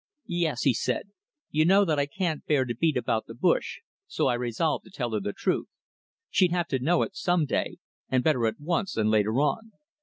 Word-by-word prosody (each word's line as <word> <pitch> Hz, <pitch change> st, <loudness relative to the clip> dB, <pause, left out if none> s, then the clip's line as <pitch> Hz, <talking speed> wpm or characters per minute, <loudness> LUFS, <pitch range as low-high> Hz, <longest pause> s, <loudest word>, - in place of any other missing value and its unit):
"Yes," 170 Hz, -7 st, -1 dB
he 135 Hz, -, +4 dB
said. 200 Hz, -, -2 dB, 0.4 s
"You 155 Hz, +1 st, +3 dB
know 195 Hz, +4 st, +5 dB
that 155 Hz, -4 st, +1 dB
I 140 Hz, -, +1 dB
can't 165 Hz, 0 st, -2 dB
bear 140 Hz, -4 st, +3 dB
to 120 Hz, -, -3 dB
beat 155 Hz, +4 st, +1 dB
about 115 Hz, -2 st, -1 dB
the 115 Hz, -, -9 dB
bush, -, -, 0 dB, 0.3 s
so -, -, -1 dB
I -, -, +3 dB
resolved 125 Hz, +6 st, -1 dB
to -, -, -14 dB
tell 125 Hz, -11 st, -3 dB
her 110 Hz, -, 0 dB
the 100 Hz, -, -3 dB
truth. -, -, -1 dB, 0.6 s
She'd 185 Hz, -3 st, +3 dB
have 175 Hz, -1 st, 0 dB
to 130 Hz, -, 0 dB
know 165 Hz, +7 st, +2 dB
it -, -, -6 dB
some 175 Hz, -3 st, +1 dB
day, -, -, -2 dB, 0.3 s
and 130 Hz, -1 st, +2 dB
better 130 Hz, -8 st, +2 dB
at 110 Hz, -, -3 dB
once 175 Hz, +6 st, -1 dB
than 110 Hz, -1 st, +1 dB
later 110 Hz, 0 st, +2 dB
on." 220 Hz, +9 st, -1 dB
150 Hz, 215 wpm, -27 LUFS, 120-175 Hz, 0.6 s, know